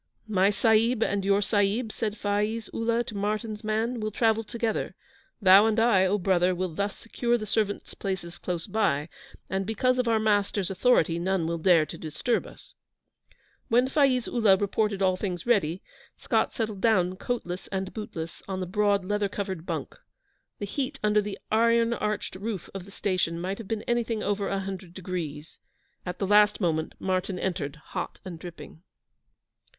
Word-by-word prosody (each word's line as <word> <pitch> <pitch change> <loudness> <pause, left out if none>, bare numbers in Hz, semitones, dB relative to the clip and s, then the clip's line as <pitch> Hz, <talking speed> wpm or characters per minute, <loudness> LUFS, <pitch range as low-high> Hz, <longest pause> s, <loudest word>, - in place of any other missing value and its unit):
'My 195 -2 +3
Sahib 225 +3 +3
and 200 -1 0
your 200 +1 +3
Sahib,' 210 +3 +1
said 215 -1 -3
Faiz 210 +2 -1
Ullah 230 +1 +1
to 230 - -8
Martyn's 210 +2 -2
man, 220 +3 -1
'will 215 0 -1
travel 225 +1 +2
together. 225 0 -2 0.4
Thou 200 +1 +7
and 220 0 +2
I, 210 -5 +4
O 200 +3 +2
brother, 185 -1 +2
will 180 -1 -2
thus 200 +4 -2
secure 240 +1 -1
the 215 - -5
servants' 210 -1 -1
places 190 -3 -5
close 175 -3 -3
by, 175 -9 0 0.4
and 190 +1 -1
because 250 +5 +1
of 250 - +1
our 225 -1 +3
masters' 205 -3 +1
authority 180 -5 +3
none 185 -1 0
will 170 0 -2
dare 165 -2 +5
to - - -8
disturb 160 +10 -1
us.' - - -14 0.9
When 245 +3 +3
Faiz 265 -3 +2
Ullah 215 -5 +4
reported 205 0 0
all 185 -1 +3
things 180 -4 -4
ready, 190 -7 +1 0.3
Scott - - +1
settled 215 -4 -3
down 185 -5 +3
coatless 185 -4 -4
and 190 -1 -4
bootless 170 -7 -6
on 190 -1 -3
the 185 - -2
broad 200 +1 +1
leather 205 +1 0
covered 190 -4 -4
bunk. - - -4 0.6
The 205 - -4
heat 275 +6 -3
under 210 0 +4
the 205 -1 -5
iron 230 +1 +4
arched 210 -2 -2
roof 200 -1 -5
of 195 -2 -6
the 200 - -13
station 185 -4 -1
might 190 +4 -3
have 225 - -8
been 220 0 -2
anything 235 -2 -1
over 200 0 0
a 195 0 -1
hundred 190 -2 -7
degrees. 165 -5 -5 0.5
At 180 - -4
the 195 - -1
last 210 +1 +5
moment 160 -5 -1
Martyn 185 0 -1
entered, 155 -7 -2 0.2
hot - - -3
and 175 -3 -7
dripping. 165 -2 -10
200 Hz, 170 wpm, -27 LUFS, 185-220 Hz, 0.9 s, Thou